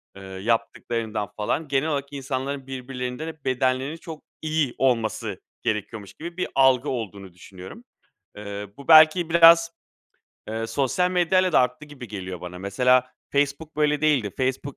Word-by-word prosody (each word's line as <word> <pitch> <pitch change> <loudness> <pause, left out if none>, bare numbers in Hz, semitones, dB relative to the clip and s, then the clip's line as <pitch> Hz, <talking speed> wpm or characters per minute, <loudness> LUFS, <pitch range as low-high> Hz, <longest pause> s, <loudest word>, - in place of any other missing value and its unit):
Eee, 100 - -11
yaptıklarından, 110 +2 -2
falan, 120 +9 -2
genel 140 +3 0
olarak 140 -1 -3
insanların 135 0 -4
birbirlerinden 125 +2 -5
hep 160 -3 -10
bedenlerinin 130 +3 0
çok 165 -2 -10 0.2
iyi 155 -4 -1
olması 110 -5 0 0.2
gerekiyormuş 105 -1 -3
gibi 170 +2 -9
bir 185 - -1
algı 130 0 +4
olduğunu 100 -6 -5
düşünüyorum. 95 - -12 0.5
Eee, 100 0 -6
bu 140 - -12
belki 160 +2 +7
biraz, 165 0 +7 0.8
eee, 115 +1 -3
sosyal 145 +9 0
medyayla 185 0 +2
da - - +6
arttı 125 +4 -1
gibi 140 -5 -11
geliyor 95 -3 -6
bana. 90 0 -8
Mesela 125 +6 +2 0.2
Facebook 145 +2 -1
böyle 150 -1 +2
değildi. 145 -9 +2
Facebook 130 +1 -2
130 Hz, 140 wpm, -24 LUFS, 110-155 Hz, 0.8 s, belki